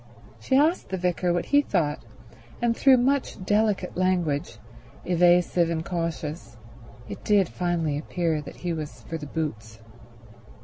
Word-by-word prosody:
She 185 - 0
asked 315 +5 +2
the 190 - -2
vicar 180 0 0
what 175 0 0
he 285 0 +4
thought, 160 - -1 0.6
and 235 -1 +1
through 265 +1 +5
much 255 -6 0
delicate 205 -2 +1
language, 175 -4 0 0.5
evasive 175 -1 +3
and 165 -1 -2
cautious, 165 -7 -4 0.5
it 100 - -8
did 205 -3 +3
finally 165 -5 -1
appear 165 -1 -1
that 150 - -10
he 175 -1 -3
was 155 -2 -7
for 165 - -5
the 150 - -7
boots. 115 -9 -5
175 Hz, 140 wpm, -25 LUFS, 155-190 Hz, 0.6 s, through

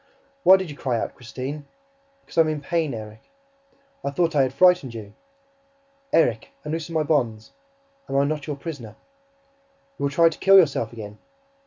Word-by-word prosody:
"Why 190 -6 +8
did 190 -4 -5
you - - -9
cry 125 -4 -1
out, - - -4
Christine?" 130 +4 -7 0.6
"Because - - -15
I 165 - +6
am 160 - +2
in 155 -1 -2
pain, 160 0 -1
Erik." 110 0 -9 0.8
"I - - -1
thought 165 +2 0
I 140 - +5
had 130 -1 +1
frightened 145 -4 +3
you." 105 -2 -9 1.0
"Erik, 120 -8 +2
unloose 160 +2 -4
my 160 -2 0
bonds... 120 -8 -1 0.6
Am 135 - 0
I 140 - +4
not 150 0 -2
your 150 - -3
prisoner?" 140 -8 -8 1.0
"You - - 0
will - - +1
try 165 +4 +4
to 165 - -10
kill 195 +1 +7
yourself 140 - +3
again." 105 -2 -9
140 Hz, 175 wpm, -24 LUFS, 120-160 Hz, 1.0 s, Why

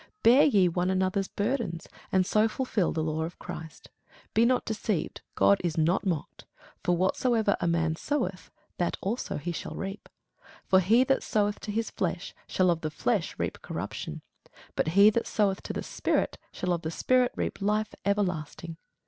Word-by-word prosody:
Bear 245 +5 +7
ye 200 -10 +4
one 175 +1 0
another's 190 +1 +1
burdens, 205 -7 -2 0.3
and 185 -1 +3
so 215 +3 +3
fulfil 220 -5 0
the 160 - -1
law 155 0 -1
of 165 +2 -4
Christ. 160 -2 -9 0.4
Be 225 +2 +4
not 250 +1 +2
deceived; 215 -4 -2
God 100 +1 +5
is 170 -2 -1
not 170 +5 +2
mocked: 165 -5 -3 0.4
for 175 -1 +2
whatsoever 215 +3 +2
a - - +1
man 165 -1 +1
soweth, 195 - -2 0.3
that 175 - 0
shall 225 +6 -2
he 165 +4 -3 0.2
also - - -6
reap. 195 +1 -6 0.6
For 190 - +5
he 220 +7 +5
that 270 +1 +2
soweth 210 -1 0
to 210 - -5
his 225 +2 -2
flesh - - -3
shall 185 -1 +3
of 165 -1 -1
the 155 - -2
flesh 150 - -1
reap - - -3
corruption; - - -5 0.5
but - - 0
he 205 +2 +9
that 230 +2 -1
soweth 200 -3 +1
to - - -5
the - - -3
Spirit - - -1
shall 180 -1 -1
of 170 - -2
the 160 - -3
Spirit 250 +8 +2
reap - - -3
life 210 +1 0
everlasting. 175 -5 -2
190 Hz, 175 wpm, -28 LUFS, 170-215 Hz, 0.6 s, he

